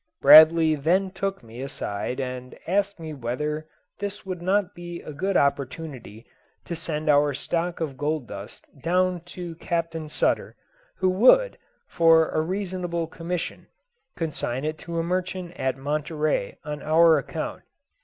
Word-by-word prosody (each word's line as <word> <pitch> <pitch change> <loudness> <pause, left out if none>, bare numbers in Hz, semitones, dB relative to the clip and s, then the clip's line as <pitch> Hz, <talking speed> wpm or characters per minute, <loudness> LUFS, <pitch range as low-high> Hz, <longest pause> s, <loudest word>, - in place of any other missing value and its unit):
Bradley 160 0 +8
then 180 +6 +1
took 195 -2 -3
me 115 +2 -10
aside 125 -3 -4
and 125 -1 -5
asked 200 +1 0
me 160 -1 -6
whether 150 +5 -3 0.3
this 205 -1 -5
would 185 -2 -5
not 195 +2 +1
be 175 0 -7
a 150 - -8
good 190 +6 0
opportunity 140 -5 -2 0.4
to 170 - -4
send 155 -1 -4
our 145 -1 +4
stock 170 +4 -2
of 150 -5 -3
gold 150 -2 -1
dust 100 0 -9 0.2
down 180 +1 +1
to 175 -1 -7
Captain 165 -2 -3
Sutter, - - 0 0.4
who 185 - +2
would, 260 - +5 0.3
for 165 -1 +4
a 155 - 0
reasonable 180 -1 -2
commission, 170 +2 -5 0.5
consign 150 -5 -3
it 155 0 -3
to 170 -1 -6
a 165 - +1
merchant 180 0 -3
at 130 -1 -1
Monterey 150 -3 -1
on 150 -1 -5
our 160 0 +5
account. 135 - -5
165 Hz, 145 wpm, -25 LUFS, 145-180 Hz, 0.5 s, Bradley